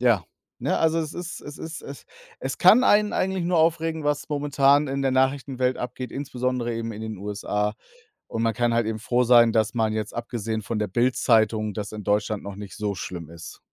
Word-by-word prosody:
Ja, 120 -7 +3 0.3
ne, - - 0
also 160 0 +2
es 155 -1 -3
ist 175 -1 -6
es 145 0 -10
ist 165 +2 -7
es 140 - -9 0.4
es 135 0 -4
kann 215 +8 +7
einen 210 -2 +4
eigentlich 190 -1 0
nur 175 0 +2
aufregen, 160 -1 +1
was 145 0 -1
momentan 145 -1 +3
in 135 +1 -2
der 135 - +2
Nachrichtenwelt 130 -1 +1
abgeht, 125 +1 -5
insbesondere 125 -3 -2
eben 115 0 -4
in 110 +1 -8
den 110 -1 -5
USA. 105 +1 -2 0.5
Und 115 - -3
man 115 -1 +1
kann 120 -1 +1
halt 115 -1 +1
eben 110 0 -2
froh 120 +3 +1
sein, 120 -1 +6
dass 110 +1 +1
man, 110 -2 +1
jetzt 110 -1 -3
abgesehen 115 -2 -3
von 115 +1 -3
der 105 - 0
Bildzeitung 110 -1 +2
das 105 0 -5
in 105 -1 -6
Deutschland 105 +1 0
noch 100 -1 -7
nicht 100 -2 -8
so 105 -1 -2
schlimm 85 -3 -6
ist. 85 0 -10
120 Hz, 205 wpm, -25 LUFS, 110-145 Hz, 0.5 s, kann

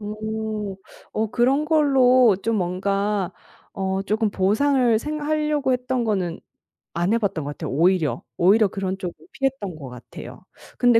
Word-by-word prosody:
오. 215 -1 -4 0.3
어 220 +1 0
그런 265 +6 +2
걸로 255 - +4
좀 225 -1 0
뭔가 195 +1 -1 0.4
어 190 0 -2
쪼금 215 +2 0
보상을 230 +4 +2
생 300 +4 -4
하려고 300 -2 0
했던 250 -1 -1
거는 185 -6 -1 0.5
안 175 +5 +1
해 230 - +4
봤던 190 -8 -1
것 145 - -4
같아요 155 0 -6
오히려. 160 -4 +2
오히려 200 +4 +4
그런 190 -1 -3
쪽은 180 -3 -5 0.2
피했던 270 - -2
것 140 -4 -9
같아요. 125 -1 -11 0.4
근데 245 -2 +5
215 Hz, 275 characters per minute, -23 LUFS, 190-250 Hz, 0.5 s, 근데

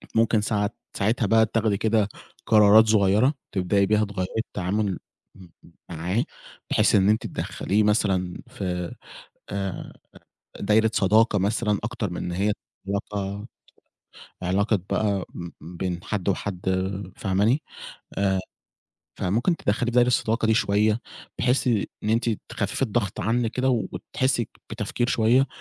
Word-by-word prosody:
ممكن 115 -1 +3
ساعات 105 0 -1 0.2
ساعتها 110 +3 +1
بقى 110 +2 +5
تاخدي 110 -2 0
كده 110 -1 +2 0.4
قرارات 110 +1 +7
صغيّرة 110 +6 +4 0.2
تبدئي 100 +1 +2
بيها 105 +1 +2
تغيّري 95 -2 -3
التعامل 100 -2 -1 0.4
م 95 -2 -14 0.4
معاه، 90 +7 -1 0.5
بحيث - - +3
إن 100 +1 +4
أنتِ 110 - +1
تدخّليه 105 +3 -1
مثلًا 95 -4 +1
في 90 -7 -4 0.6
آآ، 95 -2 -4 0.7
دايرة 110 +2 +3
صداقة 105 +2 +3
مثلًا 105 +1 +1
أكتر 105 -2 -3
من 90 - -5
إن 90 - -3
هي 100 +4 +1 0.3
علاقة 100 +1 -3 1.0
علاقة 100 +4 +1
بقى 100 -3 +1 0.4
بين 85 +2 -4
حد 105 -3 -2
وحد 95 -1 -2 0.6
فاهماني؟ 105 +9 +1 0.6
آآ، 95 -1 +2 0.8
فممكن 120 - +1
تدخّليه 110 -1 0
في - - -6
دايرة 125 0 +5
الصداقة 115 -2 +1
دي 110 - +4
شوية 105 +1 +2 0.4
بحيث 125 +1 +2 0.4
إن 105 - -1
أنتِ 115 +1 +2 0.2
تخفّفي - - -3
الضغط 110 -5 0
عنِك 115 +3 +1
كده 130 +1 0 0.2
وتحسّي 130 -3 -1 0.2
بتفكير 120 - -2
شوية، 120 +4 +3
105 Hz, 125 wpm, -25 LUFS, 95-110 Hz, 1.0 s, قرارات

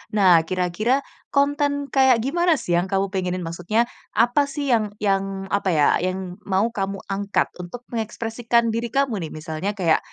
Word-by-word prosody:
nah, 185 -5 +6
kira-kira 200 +9 0 0.2
konten 285 0 0
kayak 260 -4 +4
gimana 340 +4 +2
sih 180 - -5
yang 185 - -2
kamu 195 0 0
pengenin, 185 -2 -2
maksudnya 175 +7 0 0.3
apa 245 +5 +3
sih 280 -1 -2
yang 215 -3 +1
yang, 195 -1 0
apa 200 -1 +1
ya, 150 -2 +4
yang 185 +1 -3
mau 200 +4 +1
kamu 195 -3 -3
angkat 200 +1 0
untuk 180 +8 -8
mengekspresikan 230 +1 0
diri 230 +1 -2
kamu 255 -3 0
nih? - - -12
Misalnya 160 +6 -4
kayak, 170 -5 +2
210 Hz, 160 wpm, -23 LUFS, 185-245 Hz, 0.3 s, nah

